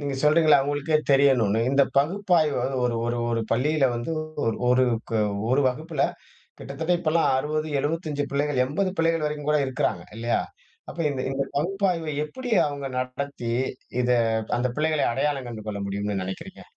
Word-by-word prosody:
நீங்க 140 -1 -3
சொல்றீங்கல்ல 155 -1 +5
அவங்களுக்கே 145 +3 0
தெரியணும்னு. 130 -6 +4
இந்த 140 +1 +4
பகுப்பாய்வு 165 0 +2
வந்து 130 +2 -2
ஒரு 120 -1 +1
ஒரு 120 0 -1
ஒரு 115 -1 0
பள்ளியில 140 +4 +2
வந்து 120 +6 -4 0.3
ஒரு 115 - +1
ஒரு 125 +1 +4 0.7
ஒரு 130 +3 +3
வகுப்புல 150 +3 -2 0.6
கிட்டத்தட்ட 160 +5 -3
இப்பலாம் 165 -2 +2
60 155 +3 -2
75 150 -1 -2
பிள்ளைகள் 140 -2 +1
80 185 +8 -1
பிள்ளைகள் 165 -1 +2
வரைக்கும் 150 -1 -4
கூட 150 - +3
இருக்கிறாங்க. 125 -9 -1
இல்லையா 115 +1 0 0.5
?அப்ப - - -11
இந்த 135 -2 -3
இந்த 135 0 -1
பகுப்பாய்வை 175 -1 0
எப்டி 250 +9 -6
அவங்க 140 -1 -4
நடத்தி, 130 -1 -4 0.5
இத 125 - 0 0.5
அந்த 125 +1 +1
பிள்ளைகளை 155 -1 +1
அடையாளம் 135 -1 -1
கண்டு 110 -3 -7
கொள்ள 100 -1 -3
முடியும்னு 100 0 -2
நினைக்கிறீங்க? 95 +1 -7
140 Hz, 150 wpm, -25 LUFS, 125-155 Hz, 0.7 s, சொல்றீங்கல்ல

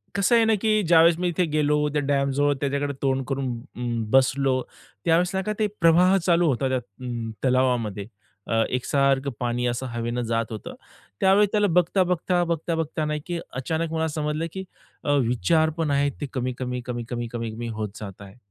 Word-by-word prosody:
कसं 200 +4 +3
आहे 230 -1 +5
ना, 220 - +3
की 215 -1 +3
ज्यावेळेस 165 0 +6
मी 180 - 0
इथे 175 +1 +1
गेलो, 150 -1 +1
त्या 150 - +1
डॅम 140 -1 +1
जवळ 145 +1 +3
त्याच्याकडे 140 0 -1
तोंड 135 -1 +1
करून 135 -2 -2 0.2
अं, 120 -2 -2
बसलो 135 0 +3 0.4
त्यावेळेस 170 +2 +3
नाही 190 0 -1
का 215 - -1
ते 215 - +2
प्रवाह 175 +3 +5
चालू 170 -1 +3
होता 135 -1 +1
त्या 130 - +1
अं, 120 0 -6
तलावामध्ये. 125 -6 +1 0.4
अ, 115 0 +2
एकसारखं 135 +2 +1
पाणी 120 0 -1
असं 120 +2 -2
हवेनं 120 +1 -2
जात 115 0 -1
होतं. 110 - -7 0.5
त्यावेळेस 195 +2 +5
त्याला 210 -1 +3
बघता-बघता, 180 0 +2
बघता-बघता 165 -2 -2
नाही 150 0 -2
की 175 -1 -2
अचानक 160 +5 -2
मला 160 0 0
समजलं, 150 +1 -2
की 190 - -5 0.4
अ, 145 - 0 0.2
विचार 160 +7 +2
पण 160 -3 0
आहेत 140 0 +2
ते - - -1
कमी-कमी, 125 -1 -3
कमी-कमी, 120 -1 -4
कमी-कमी 115 0 -4
होत 105 -1 -2
जात 100 -2 -9
आहे. 100 0 -12
140 Hz, 175 wpm, -24 LUFS, 125-165 Hz, 0.5 s, ज्यावेळेस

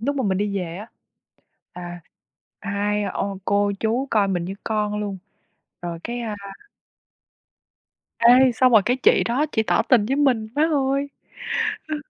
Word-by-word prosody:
lúc 285 +5 -1
mà 265 - -1
mình 190 -2 0
đi 200 -1 -1
về 170 -2 -5
á, 205 +3 -8 0.9
à, 175 -1 -8 0.6
hai 205 0 -1
ô 195 0 -3
cô 200 0 +1
chú 235 +5 0
coi 205 -3 +2
mình 180 -3 -1
như 190 +2 -5
con 210 -1 -1
luôn, 200 -2 -4 0.6
rồi 170 -1 -5
cái, 240 +1 -4
a 220 -3 -4 1.8
Ê, 245 +2 +6
xong 255 +2 +3
rồi 220 -3 +7
cái 245 +3 +1
chị 260 - +4
đó 260 +6 0
chỉ 220 - +2
tỏ - - +2
tình 235 -6 +3
với 270 +4 0
mình, 260 -7 +2
má 295 - +2
ơi. 275 0 0 0.8
Ơ. 310 - -1
215 Hz, 165 wpm, -22 LUFS, 200-255 Hz, 1.8 s, rồi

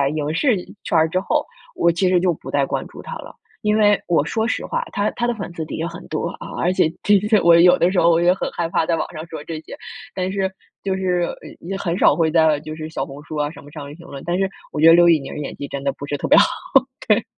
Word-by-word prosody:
影 150 0 -2
视 235 - +2 0.3
圈 - - +1
儿 160 0 +3
之 185 +2 0
后， - - 0 0.3
我 170 - +3
其 180 +2 +1
实 180 -1 +4
就 180 0 +2
不 - - -10
再 140 -1 +2
关 - - -3
注 - - -11
他 - - -8
了。 - - -11 0.3
因 210 0 +2
为 205 -2 +4
我 165 -4 +3
说 220 +8 -1
实 - - -2
话， - - -2
他 205 +1 +1
他 240 - -1
的 240 - +1
粉 195 -4 -6
丝 160 - -4
底 - - -6
下 - - -4
有 - - -1
很 170 +2 -10
多 155 - -2
啊， - - -8
而 175 - +2
且 185 - +3 0.2
其 205 -1 +5
实 215 -2 +4
我 170 0 +6
有 180 +1 +6
的 175 - +3
时 190 - +2
候 170 - +5
我 165 0 +3
也 175 +1 +5
很 190 - -3
害 170 -1 -2
怕 165 - +1
在 170 - +1
网 - - -3
上 155 -1 -7
说 160 -2 -8
这 160 0 -6
些， - - -10 0.4
但 185 0 -2
是 190 -1 -1 0.3
就 195 -1 -1
是 180 -2 0 0.2
呃， - - -10
也 190 +3 -5
很 180 -3 -2
少 - - +5
会 165 -2 +2
在 160 -2 +3
就 155 +1 -8
是 155 0 -6
小 160 - -3
红 145 +1 -11
书 155 - -8
啊 145 0 0
什 - - -13
么 145 - -14
上 150 -2 -8
面 145 - -10
评 170 +1 -15
论， 140 -4 -9
但 175 +1 0
是 195 0 +1 0.2
我 - - -4
觉 155 - +4
得 165 - +9
刘 175 0 +6
宇 165 - +6
宁 135 -1 -8
儿 - - -6
演 145 - -5
技 140 - -6
真 140 0 -6
的 140 - +1
不 145 - -8
是 145 - -3
特 - - -3
别 - - +6
好， - - +7 0.6
对。 220 +1 +3
170 Hz, 325 characters per minute, -21 LUFS, 155-190 Hz, 0.6 s, 得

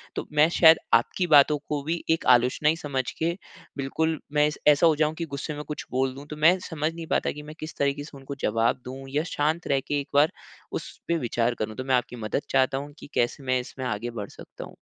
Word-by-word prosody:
तो - - -3
मैं 150 +1 +5
शायद 165 -1 +7 0.2
आपकी 145 +10 +2
बातों 150 -1 +6
को 145 -1 -1
भी 165 +3 -2
एक 165 - 0
आलोचना 125 +5 +1
ही 160 - +2
समझ 135 -5 -2 0.2
के 165 +1 +1 0.4
बिल्कुल, 160 +3 -1
मैं 150 0 +4
इस 150 - -4
ऐसा 150 +3 +6
हो 155 - +4
जाऊँ 155 +1 +1
कि 170 - -3
गुस्से 150 +2 -4
में 150 - -6
कुछ 150 - -5
बोल 130 0 0
दूँ। 140 +1 -10
तो 150 - -5
मैं 180 +3 +7
समझ 155 0 -2
नहीं 165 -1 -8
पाता - - +1
कि 150 - -9
मैं 155 +1 -10
किस 155 0 -7
तरीके 140 +1 0
से 145 -1 -11
उनको 135 +1 -8
जवाब 115 +3 +1
दूँ 135 +1 -7
या 145 +3 0
शांत 155 +3 0
रह 135 -1 +2
के 145 0 0
एक 140 - -6
बार 145 +2 +5 0.4
उसपे 170 - -4
विचार 120 -3 0
करूँ? 110 0 -3
तो 130 - -4
मैं 130 -1 +2
आपकी 125 0 -1
मदद 115 +4 -2
चाहता 135 0 +2
हूँ 145 +1 -7
कि - - -11
कैसे 120 +3 0
मैं 130 -1 +1
इसमें 130 +1 -7
आगे 110 +1 -2
बढ़ 105 -4 -6
सकता - - -11
हूँ? - - -12
145 Hz, 240 wpm, -26 LUFS, 130-155 Hz, 0.4 s, शायद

